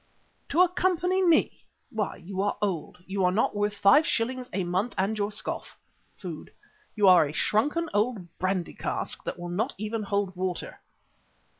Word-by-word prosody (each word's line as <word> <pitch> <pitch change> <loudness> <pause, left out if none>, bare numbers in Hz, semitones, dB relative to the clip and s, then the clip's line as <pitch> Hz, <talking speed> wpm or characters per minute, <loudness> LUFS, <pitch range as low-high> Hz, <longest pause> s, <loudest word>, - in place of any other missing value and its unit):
"To 330 +5 +4
accompany 365 +1 +2
me! 335 -3 +3 0.3
Why, 215 -3 -2
you 190 +2 -5
are 205 - 0
old, 180 -2 -3
you 190 0 -2
are 180 - +4
not 210 +3 +1
worth 205 0 -1
five 200 +10 +6
shillings 250 +2 -1
a 190 0 -1
month 185 +7 -1
and 195 +3 +1
your 205 0 -1
scoff 210 - -5 0.4
(food). - - -8 0.4
You 205 -2 +4
are 175 -5 +7
a 145 - -7
shrunken 295 - +1
old 205 -5 -1
brandy 185 -1 -1
cask - - -3
that - - -3
will 175 0 -6
not 220 +10 -1
even 215 +2 -3
hold 200 -2 -1
water." 185 -1 -4
205 Hz, 165 wpm, -27 LUFS, 185-240 Hz, 0.4 s, are